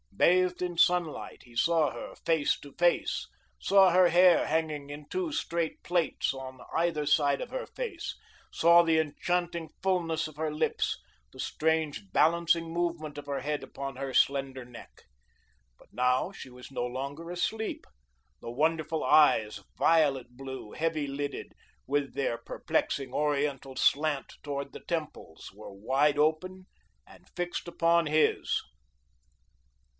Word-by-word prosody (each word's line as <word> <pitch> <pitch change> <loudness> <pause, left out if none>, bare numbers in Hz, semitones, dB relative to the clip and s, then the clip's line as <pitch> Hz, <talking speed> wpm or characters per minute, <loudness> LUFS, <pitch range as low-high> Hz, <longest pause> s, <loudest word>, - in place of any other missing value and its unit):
Bathed 180 0 +3
in 175 -1 -3
sunlight, 175 -2 +1
he 120 -1 -18
saw 160 +2 +3
her 120 - -8
face 160 -3 +1
to 140 -1 -12
face, 175 0 +1 0.3
saw 195 -1 +5
her 180 0 +5
hair 175 +1 +5
hanging 155 -3 -2
in 145 0 -9
two 365 -4 -2
straight 170 - -2
plaits 175 -2 0
on 130 -1 -8 0.2
either 160 -3 0
side 145 -2 +3
of - - -5
her - - -4
face, 420 -9 -5 0.4
saw 170 +1 +6
the 165 -1 +3
enchanting 170 +2 -1
fulness 165 -4 0
of 155 - -13
her 155 0 -1
lips, 150 - -1 0.3
the - - -14
strange, 155 -10 -1
balancing 165 - +2
movement 170 -3 -2
of 145 - -7
her 140 -2 -3
head 145 0 -2
upon 135 0 -6
her 135 0 -5
slender 135 -1 +1
neck. 120 -1 -14 0.7
But - - -22
now 125 +7 +1
she 165 - -10
was 125 +2 -12
no 125 -2 -2
longer 140 +6 -5
asleep. 220 +5 -3 0.6
The 115 - -6
wonderful 155 +3 0
eyes, 110 -9 +4
violet 140 -7 +2
blue, 130 -5 -7
heavy 155 -2 -1
lidded, 140 +1 -5 0.3
with 140 0 -1
their 130 -4 -1
perplexing, 130 +3 -2
oriental 145 -2 -1
slant 145 +1 +1
towards 140 -1 -4
the - - -10
temples, 155 - -5
were 105 0 -11
wide 135 +9 +1
open 185 +5 0 0.4
and - - -18
fixed 175 0 -3
upon 170 0 +2
his. 155 +1 +2
155 Hz, 140 wpm, -29 LUFS, 135-170 Hz, 0.7 s, saw